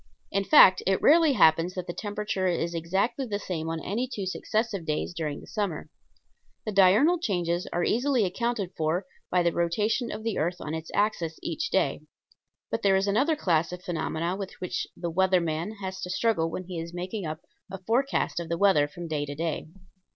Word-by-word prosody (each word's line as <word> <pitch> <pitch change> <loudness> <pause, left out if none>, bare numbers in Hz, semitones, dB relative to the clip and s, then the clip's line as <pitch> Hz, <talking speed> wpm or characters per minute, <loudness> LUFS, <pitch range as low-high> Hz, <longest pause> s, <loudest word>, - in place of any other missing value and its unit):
In 195 0 +1
fact, 195 -6 +7
it 190 0 +3
rarely 315 -1 +5
happens 165 -3 +4
that 185 -2 -4
the 175 - -5
temperature 205 -2 -2
is 170 -1 -1
exactly 190 - -1
the 205 -2 -2
same 165 -5 -4
on 165 0 -2
any 240 +6 -2
two 200 -5 -3
successive 215 +1 -2
days 155 +2 -2
during 155 -4 -3
the - - -13 0.2
year. 155 -2 -8 0.7
The 215 - -2
diurnal 210 - +5
changes 175 - -1
are 175 - 0
easily 245 0 +2
accounted 205 0 -2
for 160 +4 0 0.2
by 180 -1 +2
the 170 - +2
rotation 210 +9 0
of 215 +1 -6
the 225 -2 -1
earth 170 +3 0
on 150 - -5
its 160 0 -5
axis 190 -6 0
each 470 - -2
day. - - +1 0.7
But - - -1
there 195 -2 +4
is 190 +1 +2
another 265 +11 +2
class 170 - +1
of 180 0 -7
phenomena 170 0 -2
with 195 -1 -6
which 180 - -4
the 170 -1 -3
"weather 190 +1 +3
man" 170 +4 -2
has 190 0 -5
to 180 - -5
struggle 185 -4 +1
when 185 - -5
he 180 -2 -6
is 170 +1 -7
making 185 +1 -4
up 155 +2 -5 0.3
a 195 - -4
forecast 230 +1 0
of 170 -1 -6
the 170 - -1
weather 180 -7 +4
from 170 +3 -8
day 150 -2 -2
to 145 - -5
day. 160 0 -3
185 Hz, 200 wpm, -27 LUFS, 165-210 Hz, 0.7 s, fact